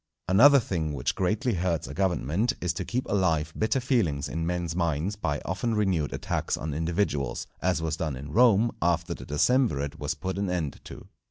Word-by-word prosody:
Another 135 +10 +7
thing 80 - -2
which 65 -3 -1
greatly 105 +6 0
hurts 85 -5 -1
a 70 - -7
government 95 - 0
is 90 -1 -1
to - - -4
keep 125 +1 -2
alive 80 -6 +1
bitter 110 +5 +1
feelings 105 - 0
in 80 0 -3
men's 85 -2 -2
minds 85 +2 0
by 75 -8 -2
often 110 +5 -1
renewed 95 -8 +1
attacks - - -2
on 75 -1 -4
individuals, 80 -3 -1 0.2
as 90 -2 0
was 80 -1 -1
done 75 -5 -2
in 70 +3 -8
Rome 115 +3 +4
after 85 -1 +1
the - - -10
decemvirate 75 - +1
was 75 +2 -2
put 95 +5 -4
an 100 -2 -1
end 85 -6 -3
to. - - -10
85 Hz, 185 wpm, -27 LUFS, 75-100 Hz, 0.2 s, Another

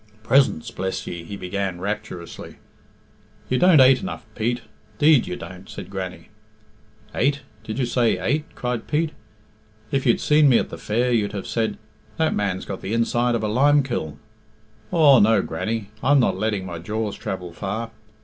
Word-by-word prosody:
"Presents, 125 - +2
bless 95 +1 -3
ye," 85 -1 -6
he 100 +4 -7
began 95 -1 -3
rapturously 95 -3 -6 0.9
"You 125 - +1
don't 180 -4 +6
ate 130 0 +6
enough, 185 - -6
Pete, 120 +3 -1 0.4
'deed 150 -3 +5
you - - -3
don't," 90 +2 -10
said - - -8
Grannie. 90 -3 -6 0.8
"Ate? 140 +3 +1 0.2
Did 110 0 -5
you 130 - +1
say 120 -4 +2
ate?" 140 +12 0
cried 125 -2 -3
Pete. 155 +1 0 0.8
"If 135 -1 0
you'd 120 - +4
seen 150 -1 +4
me 120 - +6
at - - -1
the - - -7
fair 120 +4 0
you'd 105 -3 +1
have 100 -2 -4
said, 115 -1 -1 0.4
'That 160 -1 +2
man's 95 -3 -1
got 95 - -6
the 105 - -2
inside 120 +1 +1
of 115 - -2
a - - +1
limekiln!' 130 - +2 0.7
Aw, 145 -6 +6
no, 105 -1 +4
Grannie, 110 -2 -3
I'm 145 +1 +4
not 120 - +2
letting 105 -3 -1
my 85 -2 -6
jaws 105 +4 -3
travel 90 -3 -5
far. 110 +5 -4
110 Hz, 170 wpm, -23 LUFS, 95-130 Hz, 0.9 s, don't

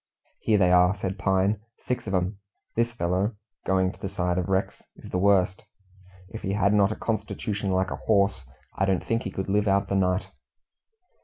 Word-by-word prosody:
"Here 110 - +2
they 90 -3 +4
are," 90 +1 +5
said 95 -1 -4
Pine; 95 +2 +2 0.2
"six 125 -3 -4
of 95 - 0
'em. 95 +2 -1 0.4
This 115 +1 +1
fellow" 95 0 -1 0.3
going 95 -1 +2
to - - -18
the 95 - -4
side 90 -2 -1
of 90 - -3
Rex 95 0 -1
"is - - -12
the 90 - 0
worst. 95 -1 +3 0.7
If 110 - -8
he 95 - -2
had 100 0 +2
not 100 -1 +4
a - - -2
constitution 105 -2 -3
like 95 0 +1
a - - -3
horse, 100 -6 +3 0.3
I 95 - +1
don't 95 -2 0
think 115 0 0
he - - -4
could 95 - -4
live 105 +2 +1
out 100 0 +2
the 100 - 0
night." 90 0 +1
95 Hz, 200 wpm, -26 LUFS, 95-105 Hz, 0.7 s, are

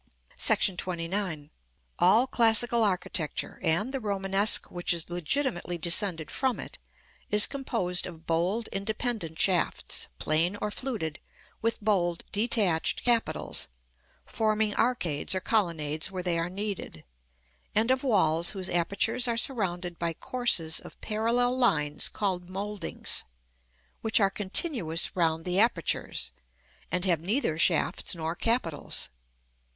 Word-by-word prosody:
§ 190 - +2
XXIX. 170 -3 -3 0.5
All 215 +8 +5
classical 235 -1 +3
architecture, 180 -5 -2
and 190 +10 +1
the 270 - -1
Romanesque 200 -1 +2
which 175 0 0
is 170 0 -3
legitimately 175 - -1
descended 170 -1 +1
from 260 -3 -1
it, - - -7 0.5
is 210 0 +8
composed 225 -10 -1
of 165 -2 -12
bold 180 +8 0
independent 200 -4 -2
shafts, 185 -3 +2
plain 165 - +1
or 210 - -3
fluted, 205 - -4 0.4
with 230 +1 -1
bold 175 -5 0
detached 205 -6 +1
capitals, 235 -2 0 0.6
forming 215 -1 0
arcades 180 -10 0
or - - 0
colonnades 165 -8 0
where 185 -1 -5
they 175 -2 0
are 165 +1 -2
needed; 195 - -6 0.7
and 225 +4 +3
of 260 0 +1
walls 170 - +3
whose 185 -1 -2
apertures 200 +8 +1
are 235 -1 -1
surrounded 180 -9 0
by 170 -1 -1
courses 175 -7 +1
of - - -13
parallel 235 +3 0
lines 150 - +1
called 185 -4 -3
mouldings, 200 0 -2 0.8
which 220 0 +2
are 195 -2 +2
continuous 190 - +1
round 165 -2 0
the 180 +1 0
apertures, 210 -7 0 0.6
and 180 +2 +1
have 175 -4 +2
neither 190 - -1
shafts 170 +1 +2
nor 165 0 -3
capitals. 175 - -1
190 Hz, 125 wpm, -27 LUFS, 170-225 Hz, 0.8 s, is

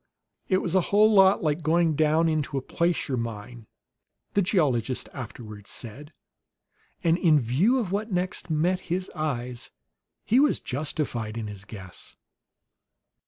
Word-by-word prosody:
"It 185 - +2
was 175 - -2
a 190 - +4
whole 215 +2 +5
lot 195 -1 +6
like 155 +1 0
going 165 +1 +2
down 155 +2 +3
into 155 -3 -1
a - - -1
placer 170 -5 0
mine," 115 -1 -6 0.7
the 200 - +3
geologist 135 - +1
afterward 110 -5 -8
said; 135 +6 -6 0.9
and 170 +1 +3
in 155 -4 +5
view 145 - +2
of 215 -8 -2
what 210 +3 -2
next 180 0 -2
met 170 +4 +1
his 185 +2 -2
eyes, 125 -6 -3 0.6
he 240 - +4
was 295 +1 +3
justified 125 -6 -3
in 115 - -3
his 105 -2 -8
guess. 95 -4 -9
155 Hz, 140 wpm, -26 LUFS, 120-180 Hz, 0.9 s, lot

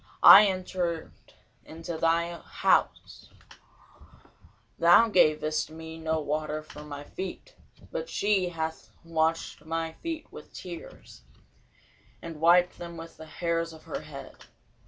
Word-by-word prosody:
I 210 +1 +11
entered 180 -3 -3 0.5
into 165 +1 -7
thine 170 +1 0
house, - - 0 1.5
thou 175 +7 +6
gavest 155 -4 +2
me 160 +1 -9
no 160 0 -1
water 155 +1 -3
for 150 -1 -12
my 145 -1 -8
feet: 190 - -8 0.4
but - - -4
she 200 -3 +1
hath 160 -1 -5
washed 165 -2 -1
my 165 0 -3
feet 325 - -6
with - - -12
tears, 175 -2 -10 1.0
and 165 -2 -9
wiped 175 +2 +4
them 170 -1 -8
with 165 0 -10
the 160 - -11
hairs 165 0 -2
of 160 - -14
her - - -5
head. - - -11
165 Hz, 120 wpm, -28 LUFS, 160-175 Hz, 1.5 s, I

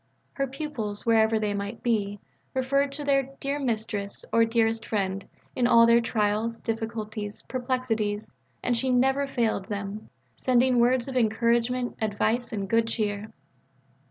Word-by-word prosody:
Her 275 -1 -1
pupils, 260 -7 -4
wherever 225 -1 +4
they 210 -1 0
might 200 +3 -5
be, 205 -4 0 0.4
referred 275 +2 +1
to 290 +1 -5
their 275 -2 +2
"dear 280 +1 -2
Mistress" 220 -5 -2
or 230 0 +5
"dearest 225 -1 +1
friend" 195 -2 -2 0.3
in 245 -1 +2
all 230 -1 +7
their 235 0 +5
trials, 220 +1 0
difficulties, 220 -2 -4
perplexities, 245 -5 -2 0.3
and 245 - +1
she 260 +3 0
never 265 +3 +3
failed 230 -7 0
them 205 0 -5 0.3
sending 255 0 +3
words 245 +1 +3
of 265 - -5
encouragement, 235 +2 +1
advice, 220 +3 0
and 200 -3 -3
good 230 +2 +2
cheer. 210 -2 -2
230 Hz, 140 wpm, -27 LUFS, 215-250 Hz, 0.4 s, all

